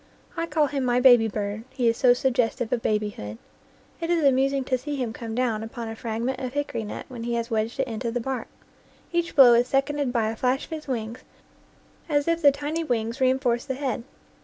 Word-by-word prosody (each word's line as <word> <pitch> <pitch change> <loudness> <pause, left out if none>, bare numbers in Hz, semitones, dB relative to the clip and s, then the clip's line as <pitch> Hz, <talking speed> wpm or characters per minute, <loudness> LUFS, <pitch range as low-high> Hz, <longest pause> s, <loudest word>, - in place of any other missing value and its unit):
I 335 0 -2
call 310 -2 +2
him 275 -1 -2
my 245 -1 +2
baby 245 -3 +7
bird, 205 0 -4
he 255 -3 -1
is 230 - +3
so 245 0 +5
suggestive 245 -2 0
of 240 - 0
babyhood. 205 - -2 0.6
It 335 -1 -3
is 340 -2 +2
amusing 275 0 +3
to 255 0 0
see 290 +3 -4
him 245 -5 -3
come 225 -1 -6
down 235 -3 0
upon 225 +1 -6
a 225 - -5
fragment 230 +3 -3
of 255 -1 -4
hickory 285 -5 -2
nut 210 - -6
when 245 -3 -8
he 235 0 -2
has 235 +1 -3
wedged 220 +3 -1
it 270 - +2
into 235 +1 -3
the 240 +1 -2
bark. 255 0 -3 0.6
Each 340 -1 -1
blow 255 -4 +9
is 240 +1 +4
seconded 275 0 0
by 230 -3 +1
a - - -6
flash 255 +4 0
of - - -23
his 310 -2 -6
wings, 230 -2 -3 0.9
as 290 0 +1
if 335 0 +1
the 285 -3 +7
tiny 295 +4 -3
wings 235 -2 -2
reinforced 255 -2 +1
the 265 - -2
head. 260 -4 -2
250 Hz, 215 wpm, -25 LUFS, 230-275 Hz, 0.9 s, blow